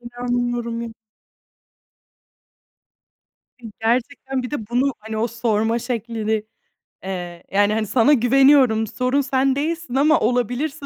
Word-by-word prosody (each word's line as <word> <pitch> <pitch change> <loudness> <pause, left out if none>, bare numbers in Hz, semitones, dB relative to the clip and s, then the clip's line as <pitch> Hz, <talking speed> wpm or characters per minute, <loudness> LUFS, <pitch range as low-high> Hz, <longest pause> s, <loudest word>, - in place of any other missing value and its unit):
İnanmıyorum 240 -1 -3
y 230 -1 -6 2.7
I 225 - -8
gerçekten 255 +3 -1
bir 250 - -6
de 225 -8 -5
bunu, 255 +3 +1
hani, 220 0 -7
o 225 +2 0
sorma 225 0 0
şeklini, 225 -3 -2 0.6
eee, 175 -2 -6
yani, 205 +1 +3
hani, 215 -1 -1
sana 255 +6 +4
güveniyorum, 255 -3 +4
sorun 255 +5 0
sen 265 0 +1
değilsin 315 -2 -3
ama 300 +3 +4
olabilirse 250 +5 -1
240 Hz, 115 wpm, -21 LUFS, 225-265 Hz, 2.7 s, sana